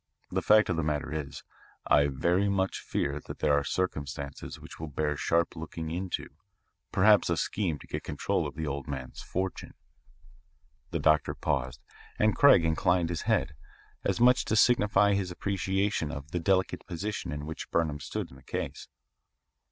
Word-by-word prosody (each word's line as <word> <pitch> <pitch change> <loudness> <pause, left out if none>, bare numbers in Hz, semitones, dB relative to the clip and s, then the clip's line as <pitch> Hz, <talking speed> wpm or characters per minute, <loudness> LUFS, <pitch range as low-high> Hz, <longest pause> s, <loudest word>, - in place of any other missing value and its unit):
The - - 0
fact 110 0 +5
of 90 - 0
the - - +1
matter 75 0 -2
is, 75 -3 -5 0.4
I 70 0 +5
very 85 +9 +1
much 95 -1 0
fear 70 +1 -2
that - - -6
there 75 - +2
are 70 0 +3
circumstances 70 -6 -3
which - - -12
will 80 - -5
bear 75 +1 -1
sharp 85 +4 +1
looking 80 0 -6
into, 90 +2 -3 0.6
perhaps 105 0 +5
a 85 - +1
scheme 90 -5 -1
to - - -14
get - - -4
control - - -1
of 70 - -9
the 80 +1 -3
old 70 -1 -4
man's 65 -3 -6
fortune." 95 +1 -4 1.1
The - - -2
doctor 75 -1 +2
paused, 65 -2 -2 0.4
and 105 0 +3
Craig 140 - +6
inclined 85 +1 +2
his 85 -2 -2
head, 70 - +2 0.5
as - - 0
much 125 +1 +6
as - - -2
to - - 0
signify 105 -3 +4
his 100 -2 0
appreciation 95 -2 -1
of 70 -1 -8
the 90 - -1
delicate 95 +1 +1
position 100 +5 -4
in 75 0 -5
which 80 +1 -6
Burnham 80 -3 0
stood - - -5
in 65 - -13
the - - -17
case. - - -5
80 Hz, 175 wpm, -29 LUFS, 75-95 Hz, 1.1 s, Craig